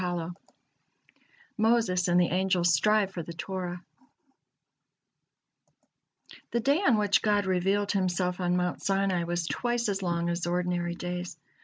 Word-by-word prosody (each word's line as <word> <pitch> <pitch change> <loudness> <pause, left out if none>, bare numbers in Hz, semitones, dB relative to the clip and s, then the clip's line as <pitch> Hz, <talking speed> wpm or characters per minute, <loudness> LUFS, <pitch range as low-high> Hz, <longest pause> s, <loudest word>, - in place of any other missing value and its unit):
MOSES 220 -5 +2
AND 175 0 +3
THE 175 - +3
ANGELS 180 -1 +2
STRIVE 210 +5 +2
FOR 180 - -5
THE 170 +1 -8
TORAH 180 0 -5 2.7
The 235 - 0
day 280 +7 +2
on 260 - +4
which 205 -1 +2
God 205 -1 +2
revealed 195 +2 +1
Himself 180 -2 0
on 180 0 +1
Mount 180 -1 -2
Sinai 195 -3 0
was 175 0 -2
twice 240 +5 -1
as 195 -1 -2
long 170 -2 -1
as 170 0 -3
ordinary 175 -1 -1
days. 180 0 -5
180 Hz, 130 wpm, -28 LUFS, 175-205 Hz, 2.7 s, on